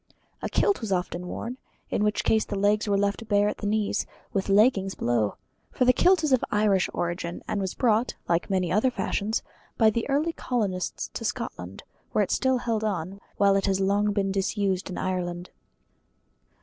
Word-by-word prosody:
A - - -3
kilt 400 - +2
was 220 -3 -4
often 180 -1 -2
worn, 240 +7 -5 0.3
in - - +1
which 210 0 +1
case 220 -1 +3
the 205 - -4
legs 205 +2 +2
were 200 -1 +2
left 205 +2 -1
bare 205 -1 +3
at - - -3
the 205 - -3
knees, 210 0 0 0.3
with 195 0 -1
leggings 195 -2 +3
below: 115 -4 0 0.4
for 255 - +1
the 250 - +6
kilt 360 +4 +4
is 295 -3 +2
of 255 - +3
Irish 205 -3 +2
origin, 175 0 -3
and 200 - -1
was 190 -1 -3
brought 235 -1 +2
like 170 +3 0
many 185 -3 0
other 215 +7 +3
fashions 210 0 -2 0.3
by 220 -1 +5
the 235 +5 -2
early 300 +4 +1
colonists 200 - -2
to - - -5
Scotland, 90 +2 -5 0.3
where 210 - +3
it 190 - -3
is - - +3
still 260 -1 +2
held 230 -3 -1
on, 195 -1 -3 0.2
while 200 -1 +4
it 195 0 +1
has 195 -1 +2
been 190 0 +1
long 205 +1 +2
disused 195 -1 0
in 185 - -5
Ireland. 180 -1 -3
205 Hz, 190 wpm, -26 LUFS, 185-220 Hz, 0.4 s, the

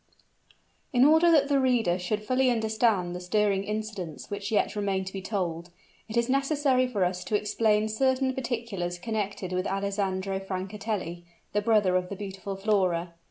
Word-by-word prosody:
In 250 0 +5
order 320 +3 +6
that 290 -3 +5
the 280 -1 +3
reader 235 -9 +2
should 210 +4 -2
fully 255 +3 +2
understand 220 -6 +1
the - - -4
stirring 195 +1 +1
incidents 210 -7 -5
which 205 +2 -4
yet 210 0 +1
remain 195 -2 -1
to 190 - -7
be 195 - -4
told, 180 -4 -3 0.4
it 220 - -3
is 235 0 +2
necessary 275 -1 +2
for 205 -7 0
us 180 0 -2
to 215 - -1
explain 210 0 +1
certain 260 +3 +1
particulars 230 -9 -3
connected 200 -2 -3
with 185 0 -1
Alessandro 195 -1 -1
Francatelli, 195 -2 -4 0.3
the 210 - +2
brother 205 -4 +3
of 180 0 -3
the 200 - -4
beautiful 195 -1 -6
Flora. 185 -4 0
205 Hz, 160 wpm, -27 LUFS, 185-230 Hz, 0.4 s, order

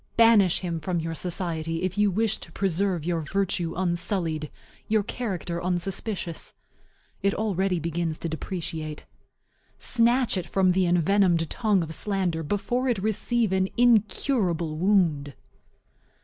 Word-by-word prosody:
Banish 225 -6 +5
him 170 -3 -3
from 175 +2 -2
your 165 0 -3
society 165 -2 -3
if 185 0 -1
you 210 0 +3
wish 215 +3 0
to - - -11
preserve 190 -3 0
your 170 -2 0
virtue 180 0 -1
unsullied, 170 -4 -1 0.4
your 215 -1 +2
character 180 -7 -4
unsuspicious. 180 0 -3 0.7
It 200 0 +1
already 195 -4 0
begins 165 0 -2
to - - -4
depreciate. 160 -1 -5 0.7
Snatch 240 -1 +2
it 180 - -3
from 190 -1 +3
the 185 0 +2
envenomed 175 -1 +3
tongue 210 -6 +2
of 160 0 -5
slander 185 -4 -1
before 205 - -1
it 240 - +1
receive 220 +2 0
an 190 0 +1
incurable 215 - +2
wound. 165 -6 +2
185 Hz, 130 wpm, -26 LUFS, 165-205 Hz, 0.7 s, Banish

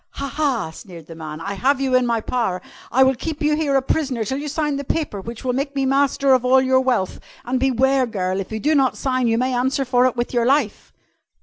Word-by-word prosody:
"Ha! 280 - -4
Ha!" 270 - -1
sneered 170 -1 -12
the 165 - -10
man. 155 -1 -8
"I 200 +4 -4
have 265 +7 +1
you 265 -1 -1
in 255 -1 +3
my 230 -1 0
power. 225 -7 -1 0.3
I 265 +2 +5
will 265 0 +4
keep 300 +4 -5
you 300 0 +3
here 300 -3 0
a 270 - +2
prisoner 265 -5 -1
till 265 +6 -3
you 295 - -5
sign 295 -1 -1
the 280 - -4
paper 280 -8 -3
which 230 +5 -8
will 250 - 0
make 275 +2 -3
me 270 -1 0
master 275 0 +2
of 255 -1 +3
all 255 +1 +5
your 260 0 +3
wealth, 245 -8 -1 0.3
and 255 +1 -1
beware, 265 0 +2
girl, 190 -4 -2
if 195 - -6
you 220 - -3
do 300 +7 +1
not 270 -3 +2
sign, 255 -2 0
you 225 0 +2
may 255 +2 0
answer 265 +3 0
for 250 0 +3
it 255 - -2
with 240 +1 -3
your 240 -1 +1
life!" 270 -5 0
255 Hz, 250 wpm, -21 LUFS, 230-275 Hz, 0.3 s, I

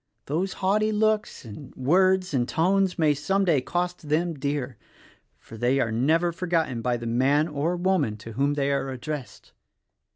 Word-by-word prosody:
Those 175 +7 -2
haughty 210 +3 +1
looks 215 -6 0
and 125 +5 -10
words 185 +6 +2
and 125 -2 0
tones 190 +3 +1
may, 155 -3 +3
some 195 +7 0
day, 155 -7 +3
cost 175 +1 -3
them 165 +3 +1
dear; 140 -4 -3 0.6
for 115 - -13
they 125 +4 +1
are 115 -4 0
never 160 +9 +2
forgotten 165 -8 -1
by 120 0 0
the 120 - -7
man 135 +6 +2
or 155 +3 -1
woman 175 - 0
to 115 +1 -10
whom 140 +5 0
they 140 -1 0
are 140 -1 -1
addressed. 130 +1 -7
150 Hz, 165 wpm, -25 LUFS, 130-180 Hz, 0.6 s, may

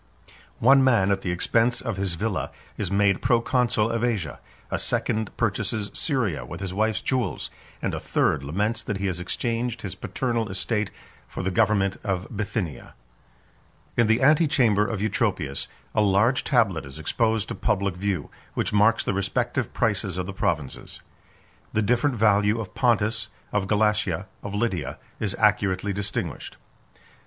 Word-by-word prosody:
One 135 +3 +6
man, 115 -7 +4
at 95 -1 +1
the 95 - -3
expense 115 +7 +2
of 115 -6 -3
his 95 -3 -1
villa, 105 +2 -2 0.3
is 100 - -2
made 100 -1 +2
proconsul 115 -2 +2
of 115 0 -1
Asia; 100 - -1 0.3
a - - 0
second 110 -1 0
purchases 105 -2 -1
Syria 125 - 0
with - - -8
his 95 -2 -4
wife's 110 0 0
jewels; 130 -3 -1 0.3
and - - 0
a - - -2
third 65 - +1
laments 105 - -1
that 105 - -3
he 100 - -3
has 90 -3 -1
exchanged 115 +5 -2
his 100 -3 -4
paternal 115 +2 -2
estate 105 +2 -1 0.4
for - - -5
the 95 - 0
government 100 -1 +2
of 95 -3 -1
Bithynia. 100 - -4 1.0
In 120 - +4
the 110 +4 +3
antechamber 135 -9 +4
of 110 -4 -3
Eutropius, 90 -10 0 0.3
a - - +3
large 105 +6 +3
tablet 105 - +2
is 70 +1 -9
exposed 110 +7 0
to - - -2
public 100 -4 0
view, 95 -4 -2 0.2
which - - -1
marks 105 +2 +4
the - - -1
respective 100 0 -1
prices 95 -3 0
of 90 - -2
the 100 - -6
provinces. 75 -7 -3 0.7
The 110 - +2
different 125 +5 +2
value 105 0 +3
of 105 -4 -6
Pontus, 115 -3 +1 0.2
of 105 -2 +1
Galatia, 105 +1 +1 0.2
of 100 - -5
Lydia, 90 - -1 0.2
is 100 -3 -1
accurately 100 -2 +2
distinguished. 100 -1 -4
105 Hz, 155 wpm, -25 LUFS, 95-115 Hz, 1.0 s, One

